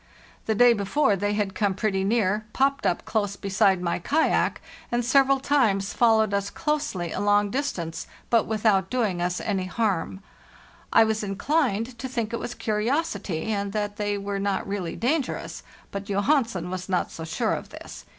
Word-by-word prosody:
The 220 - +1
day 245 +2 +6
before 205 +2 +1
they 205 +2 -1
had 205 -2 -1
come 200 -2 0
pretty 195 -1 0
near, 210 0 +1
popped 275 +1 +1
up 175 - -1
close 205 -3 -1
beside 195 -2 +2
my 170 0 -1
kayak, 300 - +1 0.3
and 240 0 0
several 275 +2 +4
times 225 -9 +1
fol 230 -2 +4
lowed 215 -2 +1
us 200 0 0
closely 295 - -2
a - - -3
long 205 0 +2
distance, 170 - -3 0.2
but 230 -2 +3
without 215 -3 +2
doing 215 -8 0
us 180 0 -1
any 195 -4 -1
harm. 190 -2 -1 0.7
I 225 - +7
was 220 0 0
inclined 230 +2 -1
to 260 - -4
think 235 -3 -3
it 235 - -1
was 245 - -5
curiosity, 220 - -1
and 200 -1 -2
that 205 -1 -2
they 205 -1 -1
were 200 0 -3
not 200 -1 -1
really 195 -4 -3
dangerous; 275 +3 -2 0.3
but 200 0 -5
Johansen 200 - 0
was 185 0 -5
not 180 -2 0
so 165 - -7
sure 160 - -1
of - - -5
this. - - -10
205 Hz, 175 wpm, -25 LUFS, 195-235 Hz, 0.7 s, I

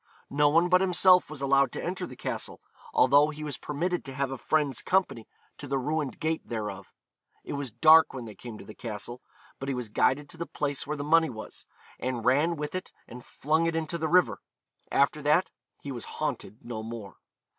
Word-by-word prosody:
No 145 +1 +4
one 165 +4 +4
but 180 +1 +4
himself 180 -1 +5
was 145 -3 -7
allowed 135 0 +3
to - - -4
enter 180 0 -3
the - - -10
castle, - - -5 0.3
although 145 +3 +5
he 155 0 -7
was 145 -4 -4
permitted 175 +5 -2
to 135 -1 -7
have 135 -1 -1
a 135 - -4
friend's 145 -5 0
company 180 - 0 0.3
to 145 - -6
the 135 +1 0
ruined 145 0 -2
gate 160 0 -1
thereof. 105 -4 -5 0.5
It - - -6
was 140 -2 -3
dark 155 +7 +6
when 125 -3 -7
they 110 - -9
came 110 +2 -9
to - - -11
the 110 - -10
castle, 120 +3 -7 0.4
but 135 - -4
he 135 - -1
was 125 -3 -4
guided 140 +7 +1
to - - -8
the 170 - -4
place 140 -1 -3
where 150 +1 -2
the 145 - -3
money 160 +1 +4
was, 110 -3 -9 0.3
and 125 -3 -3
ran 145 +7 +3
with 150 -1 -5
it 185 0 -5 0.2
and 125 +1 -10
flung 160 +4 0
it 165 - -1
into 165 +1 -2
the 160 - 0
river. 150 - +3 0.5
After 140 +2 +2
that 150 +6 +2 0.3
he 140 - -6
was 120 -3 -5
haunted 110 - -4
no 120 -2 -5
more. 110 -3 -8
145 Hz, 210 wpm, -28 LUFS, 125-160 Hz, 0.5 s, dark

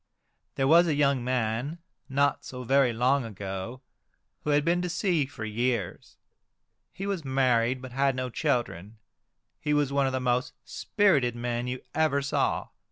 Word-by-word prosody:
There 135 - +1
was 170 +4 +6
a 155 - +1
young 140 -3 +2
man, 125 +4 -1 0.3
not 140 +1 +1
so 125 -1 -7
very 135 0 +3
long 125 +4 +2
ago, 100 +3 -6 0.6
who - - -3
had 145 0 +3
been 175 +1 +2
to 180 - -2
sea 170 -5 +1
for 120 -5 -7
years. 115 -2 -2 0.7
He 195 - -6
was 195 -5 -2
married, 130 -2 +1
but 130 - -8
had 135 +1 +1
no 130 -1 -3
children. 115 - -2 0.6
He 150 0 0
was 145 -2 +1
one 140 -1 +2
of - - -1
the 130 - -1
most 125 +1 0
spirited 145 - +1
men 120 0 -2
you 125 0 -4
ever 150 -3 +1
saw. 140 - 0
130 Hz, 165 wpm, -27 LUFS, 120-145 Hz, 0.7 s, was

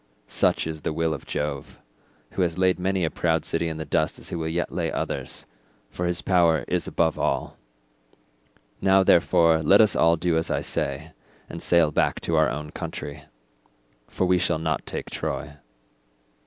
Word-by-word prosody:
Such - - +1
is 80 -1 -5
the 80 - -2
will 80 0 0
of 70 - -8
Jove, 75 -2 -4 0.5
who - - -2
has 85 -2 0
laid 95 -1 +2
many 95 -1 0
a 80 - -2
proud 80 -2 0
city 85 0 -1
in 80 -1 -4
the 80 - -5
dust 80 +2 0
as - - -6
he - - -4
will 80 -1 -3
yet 85 +2 -2
lay 85 -1 -2
others, - - -4 0.5
for 90 - -2
his 85 0 -1
power 85 -4 +3
is - - -1
above 80 -2 0
all. - - -1 1.2
Now, 95 0 +4
therefore, 85 -2 +4
let 95 +6 +5
us 105 -3 +4
all 85 0 +4
do 85 0 +1
as 80 - -3
I - - 0
say 70 +4 -3 0.4
and - - -7
sail 85 -3 +4
back - - +1
to 85 - -1
our 80 -3 +4
own 75 +2 -5
country, 70 0 -7 0.8
for 95 - -1
we 90 0 +3
shall 85 -1 +1
not 80 0 -2
take - - -5
Troy." 75 -2 -4
80 Hz, 180 wpm, -25 LUFS, 80-90 Hz, 1.2 s, let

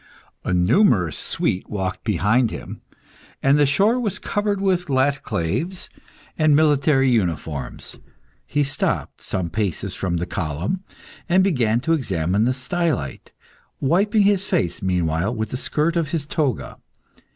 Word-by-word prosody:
A - - -2
numerous 90 - +3
suite 90 - -1
walked 95 -3 -3
behind 110 +4 +2
him, - - -8 0.6
and 140 +2 +4
the 145 - +5
shore 205 - +3
was 215 -6 -1
covered 205 -1 -1
with 185 -2 +1
_laticlaves_(*) 140 - -1 0.5
and 155 -2 +5
military 145 -3 +3
uniforms. 80 - -2 0.5
He 145 - +1
stopped, 135 -1 -2
some 85 -3 -3
paces 100 -4 -2
from 90 -3 -2
the 85 - -2
column, 85 - -3 0.5
and 185 +2 +5
began 120 - +2
to 165 +5 +1
examine 100 - 0
the 125 - +2
stylite, 155 - -2 0.5
wiping 200 - +3
his 200 -1 +3
face 100 - -1
meanwhile 90 +2 0
with 110 -1 -3
the - - -2
skirt 155 +5 0
of 165 -3 0
his 155 -2 -2
toga. 145 -5 -2
130 Hz, 135 wpm, -22 LUFS, -, 0.6 s, the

